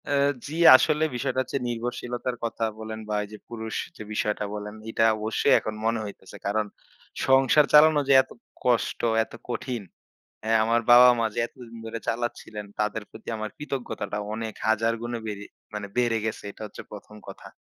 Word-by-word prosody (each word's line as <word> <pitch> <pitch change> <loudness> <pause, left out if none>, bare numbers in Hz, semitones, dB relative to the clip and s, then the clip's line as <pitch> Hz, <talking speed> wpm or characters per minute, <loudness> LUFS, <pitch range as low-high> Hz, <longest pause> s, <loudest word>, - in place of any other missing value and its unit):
অ্যা 145 - +1 0.3
জি, 150 - -6 0.2
আসলে 155 +3 +3
বিষয়টা 130 +1 -1
হচ্ছে 130 - -3
নির্ভরশীলতার 120 +1 -3
কথা 115 0 -2 0.2
বলেন 110 0 -6
বা 105 - 0
এই - - -8
যে 105 - -8
পুরুষ 110 -1 -5 0.2
যে - - -7
বিষয়টা 105 0 -1
বলেন, 105 0 -6
এইটা 115 0 +2
অবশ্যই 110 +6 +2
এখন 110 - -4
মনে 115 0 +1
হইতেছে। 95 -2 -10
কারণ 105 +2 +1 0.6
সংসার 135 +3 +5
চালানো 150 0 +7
যে - - +7
এত 130 - -24 0.3
কষ্ট, 120 -2 +1 0.2
এত - - -16 0.2
কঠিন। 120 -2 -3 0.6
অ্যা 110 +1 +1
আমার 115 +1 +2
বাবা, 125 +1 +10
মা 115 - +2
যে - - -4
এতদিন 120 -1 -13
ধরে 115 +1 -4
চালাচ্ছিলেন, 115 -3 -3 0.2
তাদের 105 0 -1
প্রতি 110 - -13
আমার 110 0 -4
কৃতজ্ঞতাটা 135 -7 -4 0.2
অনেক 110 -1 -4
হাজার 110 +1 +2
গুণে 120 0 -3
বেড়ে 105 -1 -5 0.3
মানে 105 -1 -4
বেড়ে 120 -2 +2
গেছে 110 -1 -3
এটা 100 - -11
হচ্ছে - - -10
১ম 105 +1 -10
কথা। 95 - -10
115 Hz, 175 wpm, -26 LUFS, 110-125 Hz, 0.6 s, বাবা